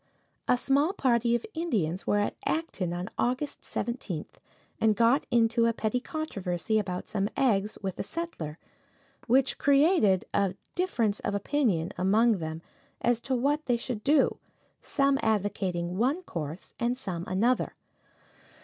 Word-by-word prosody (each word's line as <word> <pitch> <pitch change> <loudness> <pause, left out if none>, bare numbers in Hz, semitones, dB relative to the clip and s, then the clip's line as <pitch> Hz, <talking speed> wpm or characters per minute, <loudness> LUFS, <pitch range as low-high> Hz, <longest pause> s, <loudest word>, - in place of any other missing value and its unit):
A 250 - +4
small 280 +7 +2
party 240 - +2
of 235 - -2
Indians 205 - -1
were 205 - +3
at 205 - +1
Acton, 320 - -1
on 175 +1 -4
August 255 +4 -1
17th, 210 -8 -5 0.4
and 220 -1 +3
got 235 +6 +3
into 230 0 +3
a 230 - +2
petty 220 +2 -1
controversy 215 - -2
about 180 -3 -4
some 200 -1 -1
eggs 210 -6 +2
with 190 -2 -3
a - - 0
settler, 195 - -5 0.7
which 255 +2 +3
created 280 - +4
a 195 -2 +1 0.2
difference 235 - 0
of 200 - -2
opinion 200 - +1
among 210 +3 +4
them 160 0 -5 0.4
as 240 -1 +2
to 260 +2 -1
what 290 +5 0
they 245 -2 +3
should 235 -2 -5
do, 290 0 +3 0.4
some 275 -1 +1
advocating 190 -4 -1
one 280 +10 +1
course 160 - -6
and 240 +1 0
some 180 -9 -4
another. 230 +7 +1
225 Hz, 140 wpm, -28 LUFS, 190-270 Hz, 0.7 s, A